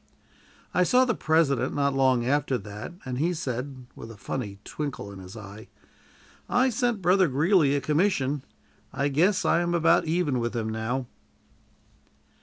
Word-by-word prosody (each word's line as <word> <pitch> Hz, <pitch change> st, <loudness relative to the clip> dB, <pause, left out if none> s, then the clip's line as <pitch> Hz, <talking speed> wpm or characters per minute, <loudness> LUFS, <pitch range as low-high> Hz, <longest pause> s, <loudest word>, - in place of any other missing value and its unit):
I -, -, +2 dB
saw 250 Hz, +8 st, +4 dB
the 245 Hz, -, +1 dB
President 160 Hz, -6 st, +1 dB
not 140 Hz, -1 st, +1 dB
long 130 Hz, -3 st, +2 dB
after 140 Hz, 0 st, +1 dB
that, 105 Hz, -, -8 dB
and 125 Hz, -1 st, -4 dB
he 175 Hz, +4 st, +1 dB
said, 130 Hz, -3 st, -5 dB
with 115 Hz, -, -10 dB
a 115 Hz, -, -11 dB
funny 100 Hz, -1 st, -5 dB
twinkle 140 Hz, -9 st, -5 dB
in 100 Hz, -, -10 dB
his 95 Hz, +3 st, -10 dB
eye: 105 Hz, 0 st, -10 dB, 0.8 s
"I 255 Hz, +1 st, +3 dB
sent 230 Hz, -3 st, -1 dB
Brother 185 Hz, +1 st, +4 dB
Greeley 150 Hz, +1 st, +3 dB
a 140 Hz, -, 0 dB
commission. 150 Hz, -2 st, +1 dB, 0.5 s
I 140 Hz, +1 st, -1 dB
guess 175 Hz, +8 st, +2 dB
I -, -, +3 dB
am 175 Hz, 0 st, 0 dB
about 165 Hz, 0 st, +3 dB
even 160 Hz, -5 st, 0 dB
with 120 Hz, 0 st, -2 dB
him 110 Hz, -1 st, -2 dB
now." 110 Hz, +4 st, -2 dB
140 Hz, 160 wpm, -26 LUFS, 125-170 Hz, 0.8 s, saw